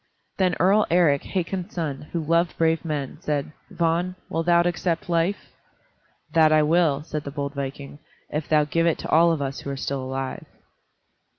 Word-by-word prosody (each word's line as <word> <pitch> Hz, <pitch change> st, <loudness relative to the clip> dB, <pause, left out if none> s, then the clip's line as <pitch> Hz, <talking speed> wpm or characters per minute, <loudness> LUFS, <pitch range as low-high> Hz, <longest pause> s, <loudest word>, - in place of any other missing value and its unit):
Then 185 Hz, -2 st, +2 dB
Earl 195 Hz, +4 st, +4 dB
Eric, 165 Hz, -5 st, +4 dB
Hakon's 185 Hz, -1 st, -3 dB
son, 150 Hz, -4 st, -4 dB
who 170 Hz, -, -1 dB
loved 170 Hz, +2 st, +1 dB
brave 165 Hz, 0 st, +2 dB
men, 150 Hz, -3 st, -4 dB
said, 150 Hz, -3 st, -2 dB, 0.2 s
"Vagn, 170 Hz, +2 st, 0 dB
wilt 165 Hz, +1 st, -2 dB
thou 170 Hz, 0 st, +5 dB
accept 175 Hz, -1 st, -1 dB
life?" 170 Hz, +4 st, 0 dB, 0.8 s
"That 160 Hz, -1 st, +5 dB
I 155 Hz, 0 st, +5 dB
will," 155 Hz, -2 st, +2 dB
said 155 Hz, -2 st, -5 dB
the 140 Hz, -, -5 dB
bold 140 Hz, 0 st, -4 dB
viking, 140 Hz, +1 st, -6 dB, 0.3 s
"if 150 Hz, 0 st, -3 dB
thou 155 Hz, -1 st, +4 dB
give 165 Hz, +3 st, +1 dB
it 165 Hz, -, +2 dB
to -, -, -7 dB
all 170 Hz, +1 st, +5 dB
of 155 Hz, -3 st, -1 dB
us 135 Hz, 0 st, -4 dB
who -, -, -7 dB
are 140 Hz, -, -4 dB
still 135 Hz, 0 st, -3 dB
alive." 130 Hz, 0 st, -5 dB
160 Hz, 180 wpm, -24 LUFS, 145-170 Hz, 0.8 s, thou